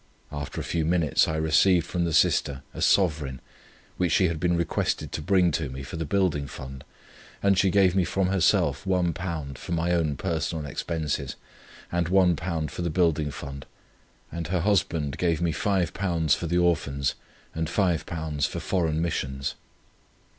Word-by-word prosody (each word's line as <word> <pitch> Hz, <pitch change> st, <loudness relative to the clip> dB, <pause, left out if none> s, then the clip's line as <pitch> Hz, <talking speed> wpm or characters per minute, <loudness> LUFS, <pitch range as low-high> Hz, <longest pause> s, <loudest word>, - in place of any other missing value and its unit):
After 75 Hz, -1 st, -5 dB
a -, -, -3 dB
few 85 Hz, -2 st, -1 dB
minutes 80 Hz, -2 st, +2 dB
I 80 Hz, -, -1 dB
received 80 Hz, +3 st, +3 dB
from 85 Hz, 0 st, -1 dB
the 85 Hz, -, -1 dB
sister 70 Hz, -2 st, +2 dB
a -, -, -7 dB
sovereign, 75 Hz, -9 st, +2 dB, 0.6 s
which 90 Hz, -2 st, +1 dB
she 90 Hz, +1 st, +4 dB
had 80 Hz, -2 st, -3 dB
been 85 Hz, +1 st, +1 dB
requested 85 Hz, -2 st, -1 dB
to -, -, -4 dB
bring 90 Hz, 0 st, +3 dB
to 80 Hz, -2 st, -2 dB
me 65 Hz, +1 st, -7 dB
for 65 Hz, -, -7 dB
the 80 Hz, 0 st, -3 dB
Building 85 Hz, -6 st, +1 dB
Fund; 65 Hz, -1 st, -9 dB, 0.6 s
and 100 Hz, -1 st, +4 dB
she 95 Hz, +1 st, +3 dB
gave 95 Hz, -1 st, +4 dB
me 95 Hz, -, +3 dB
from 90 Hz, +2 st, 0 dB
herself 95 Hz, -3 st, +2 dB
£1 85 Hz, -6 st, -2 dB
for -, -, -8 dB
my 85 Hz, +1 st, 0 dB
own 80 Hz, -4 st, +1 dB
personal 80 Hz, -3 st, -2 dB
expenses, 75 Hz, -1 st, -3 dB, 0.6 s
and 85 Hz, -1 st, 0 dB
£1 85 Hz, -4 st, +1 dB
for -, -, -5 dB
the 85 Hz, -, -1 dB
Building 80 Hz, -3 st, +1 dB
Fund, 70 Hz, -1 st, -8 dB, 0.6 s
and 85 Hz, -2 st, -4 dB
her 90 Hz, 0 st, 0 dB
husband 85 Hz, -7 st, 0 dB
gave 85 Hz, -3 st, +1 dB
me 85 Hz, -2 st, 0 dB
£5 90 Hz, -4 st, +1 dB
for 85 Hz, -, -4 dB
the 85 Hz, +2 st, +1 dB
Orphans, 75 Hz, -6 st, +1 dB, 0.4 s
and 80 Hz, 0 st, -2 dB
£5 80 Hz, -5 st, 0 dB
for -, -, -5 dB
Foreign 80 Hz, -4 st, 0 dB
Missions. 65 Hz, -5 st, -2 dB
85 Hz, 165 wpm, -26 LUFS, 75-90 Hz, 0.6 s, she